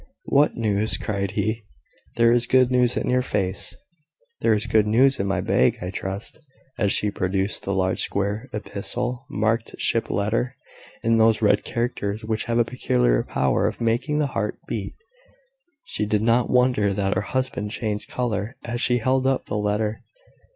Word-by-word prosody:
"What 145 +2 +3
news?" 110 -1 0
cried 100 -2 -2
he. 110 0 -1 0.5
"There 115 0 +4
is 120 0 +3
good 130 -1 +4
news 125 -1 +3
in - - -1
your 125 0 +2
face." 100 -6 -2 0.6
"There 110 - +3
is 105 +2 -1
good 110 -2 +3
news 130 +5 +4
in 100 - 0
my 100 - 0
bag, 65 - +2
I 90 +1 -4
trust." 100 +11 -4 0.4
And 100 - +2
she 105 - +2
produced 95 +2 -1
the 100 - -2
large 95 -1 +1
square 100 +5 -2
epistle, 120 +5 -4
marked 110 +2 -1
"Ship 115 - +1
letter" 115 +5 -1 0.5
in 115 0 +3
those 110 0 +4
red 105 0 +4
characters 110 -3 -3
which 110 0 -1
have 115 0 0
a 120 - +4
peculiar - - +1
power 65 - +1
of - - -4
making 120 +6 0
the 150 - +2
heart - - -2
beat. - - -4 0.9
She 105 - -3
did 105 0 +1
not 115 +2 +3
wonder 125 -5 +3
that 100 -1 0
her 95 - 0
husband 130 -3 -2
changed 105 -1 -3
colour 115 -2 -2
as 120 0 -3
she 125 - +3
held 130 +3 +1
up 135 -1 0
the - - -4
letter. 105 +1 -1
110 Hz, 170 wpm, -23 LUFS, 100-120 Hz, 0.9 s, There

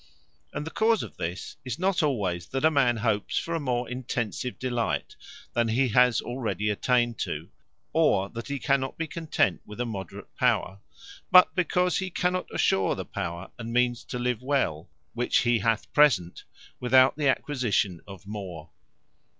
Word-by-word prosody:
And 150 - -4
the 160 - -6
cause 225 0 +2
of - - -10
this, 85 +3 -5
is 125 -2 -4
not 190 +1 +1
alwayes 95 - -1
that 135 +3 0
a 160 - +5
man 130 -5 +3
hopes 110 -2 0
for 170 - -2
a 165 - 0
more 125 -4 -1
intensive 125 -1 -3
delight, 120 -3 -2 0.4
than 120 -1 +2
he 125 +3 +2
has 125 0 +4
already 115 -4 -2
attained 120 +2 +1
to; - - -4 0.4
or 95 +1 +3
that 115 0 -7
he 140 0 -2
cannot 135 -1 0
be 165 - -2
content 155 - 0
with 105 +2 -11
a 125 - 0
moderate 95 -6 -7
power: 95 +2 +1 0.5
but 180 0 +7
because 180 0 +1
he 190 -1 -3
cannot 180 +1 -1
assure 95 -1 +2
the - - -5
power 85 +1 -5
and 115 0 -5
means 120 -1 +1
to - - -5
live 125 -1 -1
well, 125 - -1 0.2
which 120 - +2
he 120 -2 +2
hath 115 +1 -1
present, 110 - +3 0.3
without 130 +1 +5
the 150 -1 0
acquisition 120 - 0
of 95 -2 -11
more. 95 -6 -7
120 Hz, 165 wpm, -27 LUFS, 105-140 Hz, 0.5 s, but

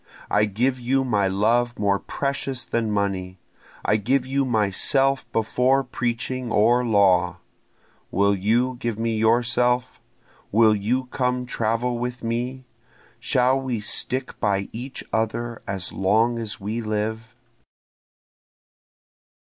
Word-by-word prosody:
I 105 +1 +4
give 125 +6 0
you 135 +2 +1
my 105 -6 +1
love 115 +5 +1
more 100 -1 +1
precious 140 -2 -3
than 115 -2 -1
money, 95 -3 -2 0.5
I 105 - +3
give 125 +5 +1
you 135 +1 0
myself 130 +5 +1
before 125 +4 +2
preaching 120 0 -3
or 120 +3 +4
law; 95 -6 +3 0.7
Will 100 +2 +2
you 120 +6 +1
give 115 -3 -2
me 115 0 -1
yourself? 120 +2 +1 0.5
will 110 0 +5
you 120 +6 -1
come 125 0 -1
travel 120 +1 -1
with 125 +1 -4
me? 125 +3 -3 0.5
Shall 130 +1 +2
we 125 -4 -2
stick 130 +5 -2
by 100 -2 0
each 125 +4 -6
other 115 +1 -2
as 95 -2 -2
long 110 +5 +2
as 110 -4 -4
we 110 +4 -3
live? 110 +1 -3
115 Hz, 120 wpm, -23 LUFS, 105-125 Hz, 0.7 s, will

